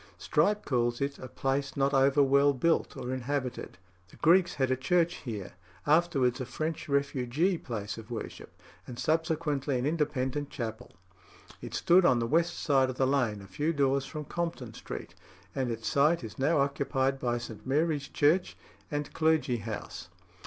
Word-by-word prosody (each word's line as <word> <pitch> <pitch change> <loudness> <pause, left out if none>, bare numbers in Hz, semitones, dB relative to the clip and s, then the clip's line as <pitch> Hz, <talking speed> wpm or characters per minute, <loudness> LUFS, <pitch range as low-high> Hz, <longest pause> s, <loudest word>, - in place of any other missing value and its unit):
Strype 195 - +1
calls 120 -2 0
it 140 0 -2
a 130 - -7
"place 135 +2 -2
not 140 +1 +2
over 135 +1 +4
well 140 +1 +4
built 165 +5 0
or 125 +1 -4
inhabited." 130 -4 -3 0.3
The - - -17
Greeks 175 +2 +4
had 130 -1 +1
a - - +3
church 170 +6 +1
here, 105 -6 -6 0.3
afterwards 145 -6 +2
a - - -2
French 155 +5 -4
refugee 140 +5 +1
place 110 -3 -5
of 110 +1 -12
worship, 115 -2 -7 0.4
and 120 - -8
subsequently 150 -1 0
an 125 - -1
Independent 145 -2 -1
chapel. 110 -4 -6 0.7
It - - -6
stood 180 +2 +5
on 130 - +5
the 115 - 0
west 165 +7 +1
side 135 -3 +2
of 130 - -5
the 135 - +3
lane, 125 -7 0
a - - -11
few 150 - -1
doors 135 -2 +1
from 150 -1 -6
Compton 165 -8 -4
Street; - - -8 0.4
and 130 -3 -1
its 115 -1 -4
site 150 +2 +3
is 110 +2 -8
now 150 +5 +2
occupied 135 -1 0
by 120 -2 0
St. 110 -3 -8
Mary's 145 0 +1
Church 160 +5 +2 0.3
and 145 -1 -3
clergy 155 -6 +2
house. 105 -6 -7
140 Hz, 165 wpm, -29 LUFS, 125-155 Hz, 0.7 s, stood